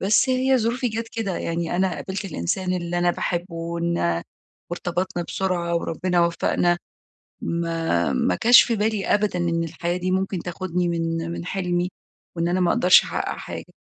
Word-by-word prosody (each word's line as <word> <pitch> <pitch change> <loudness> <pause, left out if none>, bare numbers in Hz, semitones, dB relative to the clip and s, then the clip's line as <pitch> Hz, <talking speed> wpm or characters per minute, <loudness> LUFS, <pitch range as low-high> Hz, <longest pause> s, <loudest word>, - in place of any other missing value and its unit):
بس 210 +6 +3
هي 260 0 +3
ظروفي 240 +2 0
جات 225 +1 -4
كده، 210 -6 -3
يعني 170 +1 -2
أنا 185 -1 +1
قابلت 195 +1 -5
الإنسان 180 - -2
اللي 175 0 -2
أنا 175 0 +3
باحبه 175 0 -2
ونا 170 - -1 0.5
وارتبطنا 175 0 -2
بسرعة 175 -3 -1
وربنا 175 +1 +1
وفقنا، 175 +1 +1 0.6
ما 165 +2 0
ما 250 -1 +1
جاش 245 +2 +9
في 235 - 0
بالي 210 -1 0
أبدًا 205 -3 +1
إن 170 -1 0
الحياة 170 +2 -2
دي 185 +1 -2
ممكن 190 -1 0
تاخدني 180 0 -2
من 165 0 -1
من 170 - -5
حلمي، 180 -1 -1 0.5
وإن 170 +1 +1
أنا 180 +1 +1
ما 175 -1 +3
أقدرش 180 +1 +6
أحقق - - -3
حاجة. - - -8
175 Hz, 160 wpm, -23 LUFS, 170-195 Hz, 0.6 s, جاش